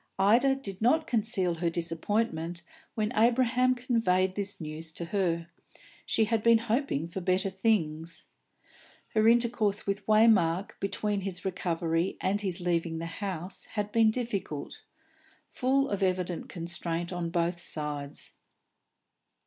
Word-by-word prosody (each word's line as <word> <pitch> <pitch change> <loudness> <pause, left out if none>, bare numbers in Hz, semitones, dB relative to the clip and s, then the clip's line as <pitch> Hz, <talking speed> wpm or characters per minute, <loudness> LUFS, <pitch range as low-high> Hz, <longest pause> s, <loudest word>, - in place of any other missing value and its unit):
Ida 235 +8 +4
did 195 -8 -5
not 310 +8 +3
conceal 215 - +1
her 170 - +2
disappointment 170 0 -2 0.3
when 215 -1 0
Abraham 250 +2 +3
conveyed 205 -7 +1
this 200 0 -4
news 160 0 -7
to 170 - -5
her; 170 -3 -1 0.6
she 220 - +2
had 225 0 0
been 230 +1 +6
hoping 230 - -1
for 180 +3 -5
better 185 +2 +1
things. 170 -5 -1 0.8
Her 215 -1 +3
intercourse 230 -3 +2
with 200 +1 -3
Waymark 210 -5 +4
between 205 +1 -1
his 185 -1 -5
recovery 170 -1 -1
and 200 +2 0
his 185 -4 -1
leaving 170 -2 0
the 165 - -4 0.2
house 185 -2 -4
had 210 -1 -4
been 225 -1 +5
difficult, 215 - -4 0.7
full 270 +2 +1
of 200 -1 -1
evident 180 -2 -1
constraint 170 0 -3
on 175 -1 -2
both 170 0 0
sides. 150 -3 -5
190 Hz, 130 wpm, -29 LUFS, 170-225 Hz, 0.8 s, been